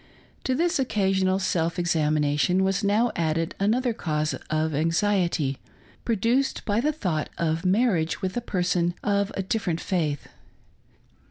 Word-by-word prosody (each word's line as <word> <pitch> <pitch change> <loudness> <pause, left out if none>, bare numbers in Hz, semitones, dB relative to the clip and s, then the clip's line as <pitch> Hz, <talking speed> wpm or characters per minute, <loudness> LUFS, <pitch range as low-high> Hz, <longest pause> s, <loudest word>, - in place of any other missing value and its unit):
To 260 - +1
this 340 +2 +1
occa 205 -7 +1
sional 190 0 +2
self 170 -3 0
examination 155 +1 +2
was 195 +2 0
now 215 +4 +2
added 165 0 0
another 235 +5 +1
cause 155 -7 -1 0.2
of 155 +1 0
anxi 165 +6 +2
•ety, 140 -5 -1 0.5
produced 235 +5 +1
by 210 +2 +1
the 300 +4 +2
thought 180 - -2
of 165 +1 0
marriage 185 -5 +2
with 190 -2 -3
a 240 - -1
person 175 -4 0
of 200 -1 +1
a 195 - -1
■different 185 -4 -1
faith. 155 -7 -2
185 Hz, 145 wpm, -25 LUFS, 160-210 Hz, 0.5 s, sional